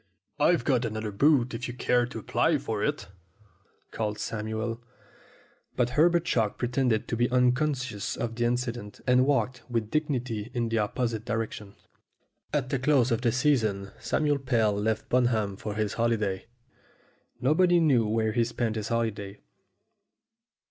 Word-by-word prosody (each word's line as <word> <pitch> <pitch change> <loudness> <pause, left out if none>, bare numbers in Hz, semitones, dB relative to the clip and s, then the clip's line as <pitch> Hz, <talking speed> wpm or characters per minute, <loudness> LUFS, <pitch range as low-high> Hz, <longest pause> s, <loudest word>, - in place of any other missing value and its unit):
"I've 170 +4 +3
got 130 -4 +2
another 110 -2 -3
boot 130 +3 +3
if 120 +2 -4
you 120 - -6
care 125 -1 +2
to 125 - -8
apply 110 - +1
for - - -3
it," - - -1 0.9
called 105 -2 -2
Samuel. 110 +2 -4 0.9
But 125 -1 +1
Herbert 170 +5 +3
Chalk 110 -9 0
pretended 125 -2 0
to - - -2
be 120 +1 +1
unconscious 125 -2 0
of 115 -1 -3
the 120 +1 -1
incident, 120 -3 -2
and 125 +1 +4
walked 130 -3 +1
with 115 -3 -2
dignity 125 -8 -2
in 120 -1 0
the 115 0 +1
opposite 110 +1 -1
direction. 110 -2 -4 0.8
At 135 -4 -1
the 135 - 0
close 135 -2 +3
of 115 - +1
the 120 -2 +2
season 110 -8 +1
Samuel 145 -2 0
Pell 115 -6 +1
left 110 +2 -1
Bunham 115 -5 +1
for 105 +1 -5
his 105 -2 -1
holiday. 110 -5 -1 0.9
Nobody 175 +7 +4
knew 130 -9 +3
where 110 0 +1
he 120 +2 +2
spent 115 -1 -2
his 105 -1 -3
holiday. 105 -4 -2
120 Hz, 150 wpm, -27 LUFS, 110-130 Hz, 0.9 s, and